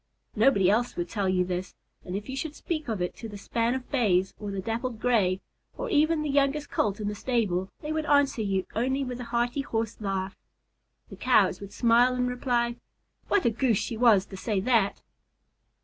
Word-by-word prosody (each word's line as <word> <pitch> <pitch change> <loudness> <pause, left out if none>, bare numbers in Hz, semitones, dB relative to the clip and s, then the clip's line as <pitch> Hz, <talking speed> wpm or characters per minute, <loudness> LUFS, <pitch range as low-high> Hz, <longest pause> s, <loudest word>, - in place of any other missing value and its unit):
Nobody 215 -4 +4
else 230 +5 +2
would 175 0 -3
tell 200 -3 -1
you 180 -1 +2
this, 180 0 -4 0.3
and 180 - -5
if 205 +1 -5
you 265 - -5
should 300 +2 -4
speak 310 -4 -4
of 215 -6 -1
it 180 - -3
to 225 - -7
the 205 - -8
span 230 +4 0
of 260 -1 -7
Bays, 190 -8 +2
or 210 - -5
the 195 -1 -3
Dappled 225 +3 -3
Gray, 200 -6 +2 0.4
or - - -4
even 310 -1 +3
the 300 - -2
youngest 280 +1 +1
Colt 205 -1 0
in 210 - -3
the 210 - -1
stable, 205 -5 -1
they 300 - -4
would 315 -1 -2
answer 285 -5 +3
you 195 -3 0
only 260 +5 0
with 250 -1 -5
a 245 - -5
hearty 240 +3 0
Horse 225 -5 -3
laugh. 195 -1 -2 0.7
The - - -10
Cows - - +3
would 200 0 -8
smile 240 +1 +4
and 250 0 0
reply, 240 -1 0 0.5
"What 390 - +2
a 235 - +4
Goose 230 -1 +1
she 225 +2 -3
was 220 -5 +5
to 190 - -10
say 205 0 -1
that!" 220 -3 +1
230 Hz, 205 wpm, -27 LUFS, 200-255 Hz, 0.7 s, was